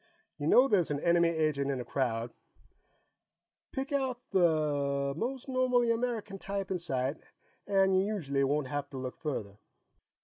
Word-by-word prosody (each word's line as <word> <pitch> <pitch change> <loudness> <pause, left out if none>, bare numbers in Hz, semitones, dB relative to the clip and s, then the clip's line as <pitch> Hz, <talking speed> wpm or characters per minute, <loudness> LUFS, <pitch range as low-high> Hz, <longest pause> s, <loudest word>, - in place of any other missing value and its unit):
You 145 - -2
know 255 +10 +6
there's 195 -9 +2
an 145 -1 -1
enemy 170 +1 +3
agent 155 -4 0
in 135 -2 -1
a 125 - -5
crowd, 115 -3 -1 1.4
pick 270 +1 -4
out 265 -3 0
the 145 -5 +2
most 255 - -3
normally 250 -2 +2
American 230 -4 -2
type 195 -1 -4
in 185 - 0
sight 135 -3 -2 0.5
and 195 -1 +3
you 190 - +4
usually 155 -10 -1
won't 145 +1 +1
have 145 +1 -4
to 135 - -8
look 130 -1 -5
further." 105 -10 -4
165 Hz, 150 wpm, -31 LUFS, 140-210 Hz, 1.4 s, know